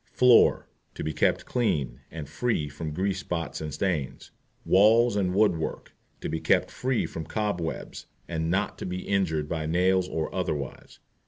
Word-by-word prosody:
FLOOR. 125 Hz, -2 st, +5 dB, 0.3 s
To -, -, -5 dB
be 80 Hz, -, -2 dB
kept 75 Hz, -, +1 dB
clean, 70 Hz, -, -1 dB
and 80 Hz, -3 st, -7 dB
free 115 Hz, -, -1 dB
from 75 Hz, +2 st, -5 dB
grease 95 Hz, +4 st, -1 dB
spots 85 Hz, -4 st, -4 dB
and 75 Hz, -1 st, -4 dB
stains. 75 Hz, -3 st, -2 dB, 0.3 s
WALLS 110 Hz, +4 st, +5 dB
AND 95 Hz, -2 st, 0 dB
WOOD 105 Hz, -4 st, +4 dB
WORK. 80 Hz, -, -5 dB, 0.3 s
To -, -, -3 dB
be 80 Hz, -, -2 dB
kept -, -, +2 dB
free 130 Hz, -1 st, 0 dB
from 80 Hz, -1 st, -6 dB
cobwebs, 95 Hz, -4 st, -3 dB, 0.2 s
and 80 Hz, -1 st, -2 dB
not 95 Hz, +4 st, -1 dB
to -, -, -5 dB
be 90 Hz, 0 st, -5 dB
injured 80 Hz, -7 st, 0 dB
by 80 Hz, -1 st, -3 dB
nails 90 Hz, +2 st, +2 dB
or 80 Hz, -1 st, -3 dB
otherwise. 75 Hz, -7 st, -4 dB
90 Hz, 165 wpm, -27 LUFS, 80-100 Hz, 0.3 s, FLOOR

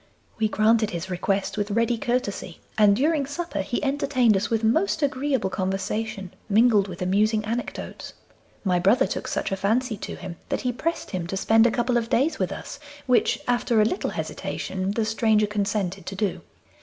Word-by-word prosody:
We 220 Hz, -, +3 dB
granted 215 Hz, 0 st, +3 dB
his 175 Hz, +2 st, -5 dB
request 195 Hz, +3 st, -1 dB
with 205 Hz, 0 st, -1 dB
ready 230 Hz, +3 st, +1 dB
courtesy, 225 Hz, -7 st, -2 dB, 0.2 s
and 205 Hz, -2 st, +5 dB
during 290 Hz, +3 st, +1 dB
supper 340 Hz, +4 st, -3 dB
he 250 Hz, -, -3 dB
entertained 260 Hz, -5 st, +2 dB
us 195 Hz, -, 0 dB
with 225 Hz, -1 st, 0 dB
most 315 Hz, -, +2 dB
agreeable 265 Hz, -6 st, 0 dB
conversation, 195 Hz, +1 st, -3 dB, 0.2 s
mingled 215 Hz, -1 st, +4 dB
with 180 Hz, -1 st, -5 dB
amusing 215 Hz, +3 st, +2 dB
anecdotes. 235 Hz, +3 st, -5 dB, 0.5 s
My 180 Hz, -3 st, +2 dB
brother 195 Hz, +7 st, +4 dB
took -, -, -4 dB
such -, -, -2 dB
a -, -, +1 dB
fancy 220 Hz, +4 st, 0 dB
to -, -, -6 dB
him 180 Hz, -2 st, -8 dB
that -, -, -1 dB
he 250 Hz, -, 0 dB
pressed 330 Hz, +7 st, -3 dB
him 180 Hz, -3 st, -3 dB
to 195 Hz, -, -3 dB
spend 225 Hz, +3 st, +4 dB
a -, -, +1 dB
couple 240 Hz, +1 st, +1 dB
of 230 Hz, -1 st, -1 dB
days 285 Hz, +7 st, +1 dB
with -, -, 0 dB
us, -, -, -7 dB, 0.3 s
which, 250 Hz, -2 st, +2 dB
after 240 Hz, -2 st, +2 dB
a 210 Hz, -, +5 dB
little 365 Hz, -, -1 dB
hesitation, 190 Hz, 0 st, -4 dB
the 215 Hz, +2 st, 0 dB
stranger 220 Hz, -1 st, +2 dB
consented 200 Hz, -3 st, -2 dB
to 195 Hz, -, -4 dB
do. 195 Hz, -1 st, -1 dB
215 Hz, 180 wpm, -25 LUFS, 195-245 Hz, 0.5 s, and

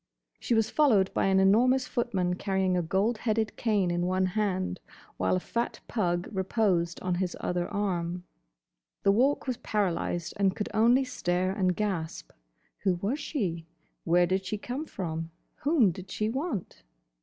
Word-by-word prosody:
She 235 Hz, -, 0 dB
was 225 Hz, -1 st, +2 dB
followed 220 Hz, -11 st, +3 dB
by -, -, +1 dB
an 190 Hz, 0 st, +4 dB
enormous 245 Hz, +7 st, +4 dB
footman 195 Hz, -9 st, -1 dB
carrying 190 Hz, 0 st, 0 dB
a 180 Hz, -, +2 dB
gold 195 Hz, +7 st, 0 dB
headed 220 Hz, -1 st, 0 dB
cane 205 Hz, -6 st, +1 dB
in 175 Hz, 0 st, 0 dB
one 185 Hz, +1 st, +1 dB
hand, 185 Hz, -1 st, -1 dB, 0.4 s
while -, -, +1 dB
a -, -, +1 dB
fat 235 Hz, +6 st, -3 dB
pug 175 Hz, -5 st, 0 dB
reposed 190 Hz, -3 st, 0 dB
on 185 Hz, -1 st, -1 dB
his 180 Hz, 0 st, -2 dB
other 175 Hz, -1 st, -1 dB
arm. 180 Hz, -4 st, -2 dB, 0.8 s
The 200 Hz, -, +5 dB
Walk 260 Hz, +8 st, +2 dB
was 255 Hz, -3 st, -2 dB
paralysed 175 Hz, -4 st, -1 dB
and 195 Hz, -2 st, +2 dB
could 210 Hz, -, -3 dB
only 235 Hz, +5 st, +4 dB
stare 185 Hz, -7 st, -1 dB
and 185 Hz, -2 st, +1 dB
gasp. 165 Hz, -, -3 dB, 0.5 s
Who 190 Hz, -3 st, +1 dB
was 205 Hz, -, -2 dB
she? 180 Hz, -, -3 dB, 0.4 s
Where 175 Hz, +1 st, +4 dB
did 190 Hz, +2 st, 0 dB
she 210 Hz, -, -3 dB
come 255 Hz, +8 st, -5 dB
from? 165 Hz, -3 st, -4 dB, 0.3 s
Whom 280 Hz, -, +3 dB
did 185 Hz, +3 st, -10 dB
she 215 Hz, 0 st, -1 dB
want? 265 Hz, -, -4 dB
190 Hz, 160 wpm, -28 LUFS, 180-225 Hz, 0.8 s, The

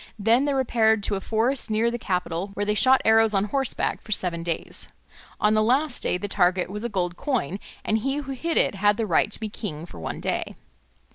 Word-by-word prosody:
Then 230 Hz, +6 st, +3 dB
they 285 Hz, -, +1 dB
repaired 220 Hz, -5 st, +2 dB
to 200 Hz, -, 0 dB
a 195 Hz, -, -4 dB
forest 230 Hz, +5 st, 0 dB
near 220 Hz, +2 st, +1 dB
the 240 Hz, -, -4 dB
capital 180 Hz, -2 st, -2 dB
where 205 Hz, -, -1 dB
they 210 Hz, -, +1 dB
shot 260 Hz, +5 st, +5 dB
arrows 220 Hz, -1 st, +4 dB
on 195 Hz, -, +3 dB
horseback 265 Hz, +5 st, -1 dB
for 215 Hz, -, -12 dB
seven 175 Hz, -4 st, 0 dB
days. 165 Hz, -1 st, -4 dB, 0.5 s
On 210 Hz, 0 st, +3 dB
the 215 Hz, -, +3 dB
last 260 Hz, +5 st, +1 dB
day -, -, 0 dB
the 205 Hz, -, -4 dB
target 185 Hz, -2 st, +1 dB
was 210 Hz, +2 st, -5 dB
a 240 Hz, -, -2 dB
gold 180 Hz, -4 st, -2 dB
coin, 225 Hz, -, -2 dB, 0.3 s
and 220 Hz, -, +1 dB
he 270 Hz, +5 st, -1 dB
who 285 Hz, -2 st, -4 dB
hit 325 Hz, +5 st, -2 dB
it -, -, +3 dB
had 205 Hz, +1 st, +2 dB
the 225 Hz, -, 0 dB
right 205 Hz, +2 st, +2 dB
to -, -, -2 dB
be 220 Hz, -, -3 dB
king 175 Hz, -7 st, -6 dB
for 125 Hz, -, -12 dB
one 80 Hz, -, -5 dB
day. -, -, -3 dB
215 Hz, 225 wpm, -25 LUFS, 195-240 Hz, 0.5 s, shot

